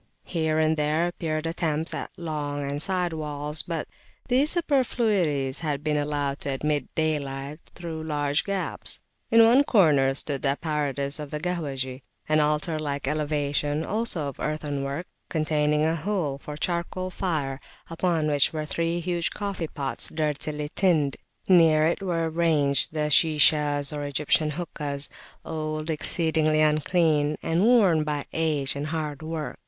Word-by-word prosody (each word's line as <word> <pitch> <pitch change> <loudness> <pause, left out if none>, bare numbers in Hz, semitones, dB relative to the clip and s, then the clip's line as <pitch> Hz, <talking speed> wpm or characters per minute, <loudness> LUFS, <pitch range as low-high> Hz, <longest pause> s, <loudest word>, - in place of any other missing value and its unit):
Here 160 -3 0
and 160 0 +2
there 150 +3 +1
appeared 155 -2 -3
attempts 165 -1 0
at - - -4
long 145 -4 -3
and 145 +1 -2
side 180 -1 0
walls, 150 -1 -2
but 165 -3 -4 0.4
these 265 +4 +3
superfluities 215 - +1
had 150 -3 -2
been 155 -1 0
allowed 145 -1 -1
to - - -4
admit 145 0 -1
daylight 145 -2 -2 0.2
through 165 -2 -6
large 145 -2 0
gaps. 200 -2 -2 0.3
In 230 0 +7
one 250 +5 +6
corner 150 - +4
stood 140 -1 -1
the 140 0 +1
apparatus 145 -3 -2
of 150 -1 -6
the 150 - -4
"Kahwahji," 140 -6 -3 0.3
an 155 0 +3
altar 150 +1 +1
like 145 -3 -3
elevation, 150 0 0
also 210 -9 -1
of 140 - -7
earthen 150 -2 -2
work, 140 +6 -3 0.2
containing 150 -1 +1
a 160 +1 +1
hole 165 -5 -2
for 150 +1 -7
a - - -10
charcoal 175 +3 -2
fire, 150 -8 -2 0.3
upon 165 -1 0
which 145 -2 +3
were 155 -1 -3
three 165 +2 -1
huge 170 -1 -1
coffee 200 -5 -4
pots 140 -2 -2
dirtily 150 -1 -2
tinned. 160 -8 +2 0.3
Near 165 -4 +6
it 170 +4 0
were 170 -4 0
ranged 160 -3 +2
the 150 -1 0
Shishas, 150 -2 +3
or 145 0 -3
Egyptian 150 +2 +1
hookahs, 150 -3 -4 0.4
old, 155 0 -3
exceedingly 155 -1 +1
unclean, 155 -1 +2
and 165 +3 +1
worn 205 -9 +5
by 150 -2 -2
age 150 -4 +1
and 145 +1 -3
hard 155 -2 -3
work. 155 -1 -5
155 Hz, 150 wpm, -26 LUFS, 145-165 Hz, 0.4 s, In